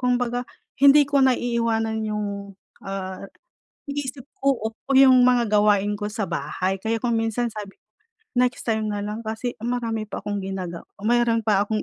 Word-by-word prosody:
kumbaga, 245 Hz, -1 st, 0 dB, 0.3 s
hindi 280 Hz, +1 st, +8 dB
ko 280 Hz, 0 st, +1 dB
naiiwanan 230 Hz, -3 st, +1 dB
'yong, 210 Hz, -1 st, -2 dB, 0.6 s
ah 195 Hz, 0 st, -5 dB, 0.6 s
iniisip 280 Hz, -1 st, -5 dB
ko 270 Hz, -5 st, 0 dB, 0.2 s
'yong 260 Hz, -2 st, +7 dB
mga 245 Hz, -3 st, +3 dB
gawain 205 Hz, 0 st, +3 dB
ko 205 Hz, 0 st, -4 dB
sa 210 Hz, -5 st, -3 dB
bahay. 170 Hz, +4 st, -2 dB
Kaya 225 Hz, +3 st, -2 dB
kung 235 Hz, -1 st, 0 dB
minsan 225 Hz, +2 st, 0 dB
sabi 210 Hz, -3 st, -8 dB, 0.6 s
next 250 Hz, 0 st, +1 dB
time 220 Hz, -2 st, 0 dB
na 205 Hz, -1 st, -2 dB
lang 210 Hz, +2 st, -4 dB
kasi 225 Hz, +2 st, -4 dB
marami 230 Hz, -2 st, -2 dB
pa -, -, -6 dB
akong 205 Hz, 0 st, -2 dB
ginaga 185 Hz, -3 st, -5 dB, 0.2 s
mayro'n 230 Hz, 0 st, +2 dB
pa 205 Hz, -2 st, +3 dB
akong 215 Hz, 0 st, -1 dB
225 Hz, 150 wpm, -23 LUFS, 205-245 Hz, 0.6 s, hindi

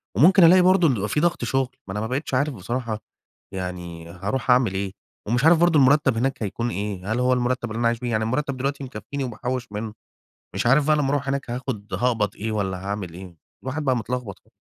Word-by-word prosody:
وممكن 180 Hz, -, +6 dB
ألاقي 180 Hz, +3 st, +8 dB
برضه 180 Hz, -2 st, +5 dB
إن 135 Hz, -, +3 dB
بيبقى 105 Hz, -2 st, -2 dB
في -, -, +1 dB
ضغط 175 Hz, -3 st, +1 dB
شغل. 130 Hz, +1 st, -1 dB
ما -, -, -6 dB
أنا 105 Hz, -, -3 dB
ما 110 Hz, -, -2 dB
بقيتش 130 Hz, +4 st, -3 dB
عارف 140 Hz, +3 st, +1 dB
بصراحة 115 Hz, +2 st, -3 dB, 0.5 s
يعني 90 Hz, -3 st, -6 dB
هارُوح 100 Hz, +9 st, -2 dB
أعمل 125 Hz, -6 st, +4 dB
إيه؟ 95 Hz, 0 st, -2 dB, 0.4 s
ومش 120 Hz, +4 st, +1 dB
عارف 165 Hz, +1 st, +7 dB
برضه 170 Hz, -3 st, +4 dB
المُرتب 135 Hz, -2 st, +4 dB
هناك 130 Hz, 0 st, -1 dB
هيكُون 115 Hz, +4 st, -2 dB
إيه، 100 Hz, 0 st, -4 dB
هل 120 Hz, -, -1 dB
هو 125 Hz, 0 st, +3 dB
المُرتب 125 Hz, -1 st, -1 dB
اللي 110 Hz, -, -4 dB
أنا 120 Hz, -, +3 dB
عايش 115 Hz, 0 st, 0 dB
بيه؟ 120 Hz, -1 st, -3 dB
يعني 110 Hz, -1 st, +1 dB
المُرتب 130 Hz, +4 st, -1 dB
دلوقتي 140 Hz, +2 st, -2 dB
مكفيني 130 Hz, +3 st, -5 dB
وباحوّش 125 Hz, +1 st, -3 dB
منه. 105 Hz, +1 st, -5 dB, 0.6 s
مش 95 Hz, +4 st, -1 dB
عارف 140 Hz, +4 st, +4 dB
بقى 155 Hz, 0 st, +4 dB
لمّا 140 Hz, -2 st, +1 dB
أرُوح 140 Hz, -1 st, -1 dB
هناك 140 Hz, -2 st, -2 dB
هاخد 120 Hz, -4 st, -5 dB
هاقبض 115 Hz, -4 st, 0 dB
إيه 110 Hz, +2 st, -3 dB
والّا 95 Hz, -3 st, -1 dB
هاعمل 100 Hz, -4 st, -4 dB
إيه؟ 90 Hz, -1 st, -10 dB, 0.3 s
الواحد 135 Hz, +4 st, -3 dB
بقى 130 Hz, -2 st, +2 dB
متلخبط 120 Hz, -4 st, -4 dB
خ -, -, -33 dB
125 Hz, 220 wpm, -23 LUFS, 105-135 Hz, 0.6 s, ألاقي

